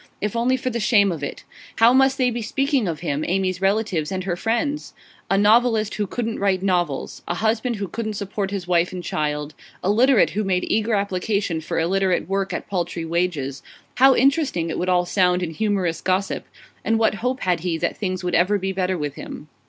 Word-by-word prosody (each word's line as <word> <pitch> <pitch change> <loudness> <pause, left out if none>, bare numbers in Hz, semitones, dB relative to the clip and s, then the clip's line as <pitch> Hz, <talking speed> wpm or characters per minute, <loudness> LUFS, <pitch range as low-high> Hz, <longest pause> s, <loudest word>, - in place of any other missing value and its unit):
If 210 +2 -2
only 245 +3 +2
for 255 0 -3
the 235 - -2
shame 210 -3 +4
of 160 -4 -5
it! 145 - -5 0.3
How 230 +2 +5
must 270 +1 +4
they 255 -3 +2
be 240 0 -3
speaking 270 +1 0
of 160 -4 -3
him, 145 +2 -2
Amy's 185 0 0
relatives, 195 -5 0
and 185 -1 -2
her 180 -2 -2
friends? 240 +10 -2 0.3
A 195 - +3
novelist 220 +1 +3
who 205 -1 -2
couldn't 230 +2 -3
write 195 -2 +1
novels; 175 -7 -1
a 175 - -1
husband 225 +4 0
who 200 -2 -4
couldn't 215 +3 -4
support 200 0 -3
his 195 -3 -4
wife 175 -1 +2
and 180 -1 -6
child; 150 -1 -2 0.3
a 190 - +2
literate 245 +2 +4
who 215 +2 -1
made 185 -2 0
eager 220 +1 +1
application 200 -3 -1
for 155 - -4
illiterate 185 +2 +1
work 195 0 -1
at - - -4
paltry 175 -3 -3
wages 160 -5 -2 0.4
how 265 +2 +6
interesting 270 - +2
it - - -3
would 180 - -1
all 180 -1 +3
sound 180 -1 +2
in 165 - -3
humorous 190 -2 -1
gossip! 190 +1 -1 0.4
And 225 - +2
what 220 -1 +2
hope 255 +2 -1
had 180 -2 +1
he 170 0 -2
that - - -1
things 185 -3 -3
would 180 -1 -2
ever 185 +5 +3
be 190 0 -2
better 185 -1 -1
with 145 -3 -3
him? 150 +1 -9
195 Hz, 205 wpm, -22 LUFS, 175-220 Hz, 0.4 s, how